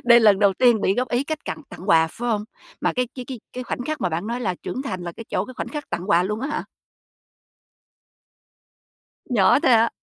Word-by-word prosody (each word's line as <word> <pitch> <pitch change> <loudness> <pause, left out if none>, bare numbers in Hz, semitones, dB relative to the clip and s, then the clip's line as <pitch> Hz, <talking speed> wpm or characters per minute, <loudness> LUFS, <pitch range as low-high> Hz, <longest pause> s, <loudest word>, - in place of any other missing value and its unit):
Đây 235 0 +7
lần 210 -3 +6
đầu 200 -1 +4
tiên 240 0 +4
bị 190 - +2
góp 250 +2 -1
ý 245 +3 0
cách 310 0 -4
tặng- 310 - -5
tặng 190 - -9
quà, 160 0 +6
phải 240 +8 -5
hông? 210 -2 0 0.4
Mà - - +1
cái 250 -1 -1
cái 250 - -5
cái 250 -2 -7
cái 255 0 -4
khoảnh 245 - -4
khắc 310 0 -3
mà 180 - +1
bạn 170 +4 -3
nói 235 +2 -3
là 195 -7 -1
trưởng 260 - -4
thành 185 -10 -4
là 175 -1 -5
cái 230 - -9
chỗ - - 0
cái 255 - -10
khoảnh - - -4
khắc 295 -1 -6
tặng 180 +4 -3
quà 175 -3 +5
luôn 210 +3 -2
á 270 - -2
hả? 300 - -3 2.7
Nhỏ 235 0 +5
thôi - - +3
hả? 230 -1 +5
235 Hz, 240 wpm, -23 LUFS, 195-255 Hz, 2.7 s, Đây